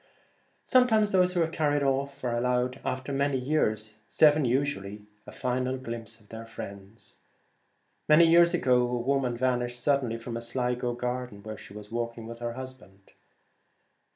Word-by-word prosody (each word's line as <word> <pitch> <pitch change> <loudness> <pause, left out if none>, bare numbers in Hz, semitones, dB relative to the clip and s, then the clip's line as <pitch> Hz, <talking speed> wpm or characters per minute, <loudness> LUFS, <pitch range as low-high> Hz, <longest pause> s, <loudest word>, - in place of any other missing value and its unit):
Sometimes 220 -5 +4
those 180 -1 +3
who 175 -2 +2
are - - 0
carried 145 -3 0
off 140 +1 -1
are 120 -2 0
allowed 125 +1 0
after 130 +2 -3
many 140 0 +1
years 110 -6 -1
— - - -40
seven 150 -2 +4
usually 115 -6 -1
— 105 - -39
a - - -8
final 130 +1 -1
glimpse 115 -2 -7
of 105 - -24
their 115 0 -8
friends. 100 0 -10 0.9
Many 155 +2 +7
years 170 +1 +6
ago 125 -6 +3
a 125 0 0
woman 125 -1 0
vanished 120 -1 -1
suddenly 125 -3 +1
from 115 0 -6
a 115 - -4
Sligo 125 0 -1
garden 125 -4 -4
where 110 0 -6
she 100 - -13
was 105 0 -10
walk 115 0 -3
ing 115 - -8
with 115 +1 -8
her 120 0 -3
husband. 130 -7 -11
125 Hz, 170 wpm, -28 LUFS, 115-140 Hz, 0.9 s, Many